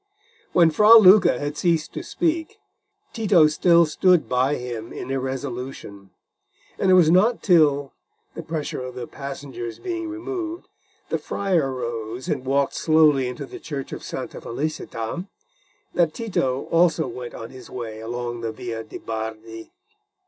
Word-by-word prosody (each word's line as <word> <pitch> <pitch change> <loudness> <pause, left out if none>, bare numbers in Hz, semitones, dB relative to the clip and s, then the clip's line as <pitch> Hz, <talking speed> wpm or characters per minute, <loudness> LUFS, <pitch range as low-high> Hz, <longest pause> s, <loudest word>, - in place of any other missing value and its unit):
When 170 -2 +5
Fra 210 +8 +7
Luca 195 - +7
had 145 +2 -4
ceased 165 -3 0
to - - -4
speak, 335 -2 -2 0.6
Tito 205 -8 +4
still 170 +2 +4
stood 175 +2 +3
by 130 +3 +1
him 120 -3 -6
in - - -6
irresolution, 130 -6 -5 0.7
and 190 - +2
it 185 - +7
was 165 -3 +5
not 215 +7 +3
till, 145 -7 +3 0.4
the - - -6
pressure 155 -5 -4
of 125 0 -7
the 125 -1 -5
passengers 135 -4 -7
being 340 -2 -4
removed, 340 0 -5 0.4
the - - -1
friar 175 -9 0
rose 120 -1 -5
and 130 - -2
walked 140 +1 +1
slowly 155 -5 +3
into 125 +3 -6
the - - -10
church 140 -4 -6
of - - -6
Santa - - -6
Felicita, 150 - -4 0.7
that 170 -3 +1
Tito 135 - -1
also 165 -1 +3
went 125 -1 -7
on 115 - -8
his 130 -1 -12
way 115 -3 -6
along 120 +1 -5
the 115 -1 -3
Via 115 -1 -6
de' 110 - -9
Bardi. 110 0 -6
140 Hz, 150 wpm, -23 LUFS, 120-175 Hz, 0.7 s, Fra